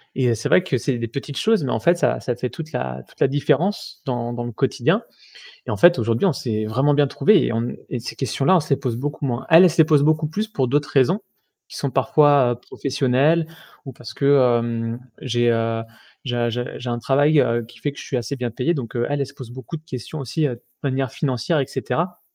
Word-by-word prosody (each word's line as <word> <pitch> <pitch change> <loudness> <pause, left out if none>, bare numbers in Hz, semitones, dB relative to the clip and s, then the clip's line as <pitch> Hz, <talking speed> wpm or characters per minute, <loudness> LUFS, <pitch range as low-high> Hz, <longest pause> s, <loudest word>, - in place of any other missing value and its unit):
Et 125 -2 +2
heu, 115 - +2
c'est 115 - -3
vrai 185 - +5
que 140 -8 -1
c'est 125 +1 -1
des 115 0 -3
petites 140 +4 -6
choses, 220 -7 +2
mais 130 - -2
en 110 - 0
fait 170 +10 +3
ça - - +1
ça 125 - -3
fait 125 +1 -3
toute 155 +6 -8
la 65 0 -4
toute - - -23
la - - +6
différence 150 +7 -1
dans 120 -2 -2
dans 120 0 -4
le 120 - -5
quotidien. 110 - 0 0.6
Et - - -4
en 105 - -1
fait 175 - +6
aujourd'hui 115 - +1
on 185 - +3
s'est 110 -5 -3
vraiment 135 +7 +1
bien 145 -1 +3
trouvés 205 +6 +4
et - - -1
on 115 - 0
e 120 - -4
et 125 - -2
ces 115 - -7
questions-là 135 - +1
on - - +4
se 150 - -10
les 140 - +4
pose 125 -4 -2
beaucoup 145 +3 -3
moins. 120 -1 -2
Elle, 165 +3 +9
elle 180 - +6
se 170 - -8
les 160 - +8
pose 150 -2 +3
beaucoup 155 0 +2
plus 210 +8 -2
pour 135 - -1
d'autres 145 +2 0
raisons, 140 - +3 0.5
qui - - -10
sont 140 - -2
parfois, 135 0 +4
heu, - - -2
professionnelles 140 +5 +1 0.4
ou 135 - -8
parce 120 - -11
que, - - -4
heu, 120 -4 +2 0.2
j'ai, 120 -2 +1
heu 115 0 0 0.4
j'ai 120 -2 -2
un 120 0 +1
j'ai 120 +2 -2
j'ai 125 - -5
un 120 - -2
travail, 145 +5 +3
heu, 115 -2 +1
qui 120 - -17
fait 145 - -2
que - - -15
je - - -8
suis 135 - -3
assez 120 +3 -3
bien 125 -2 -3
payé 130 +9 0
donc 130 -7 -5
heu, 120 - 0
elle, 145 0 -1
elle 140 - 0
se 135 - -13
pose 130 -4 -10
beaucoup 130 +6 -7
de 155 - -12
questions 130 +2 -7
aussi, 145 +3 -1
heu, 130 - -2
de - - -22 0.2
manière 135 -2 -1
financière 135 +3 0
et 135 - -1
cetera. 175 +5 -3
130 Hz, 260 wpm, -21 LUFS, 120-150 Hz, 0.6 s, Elle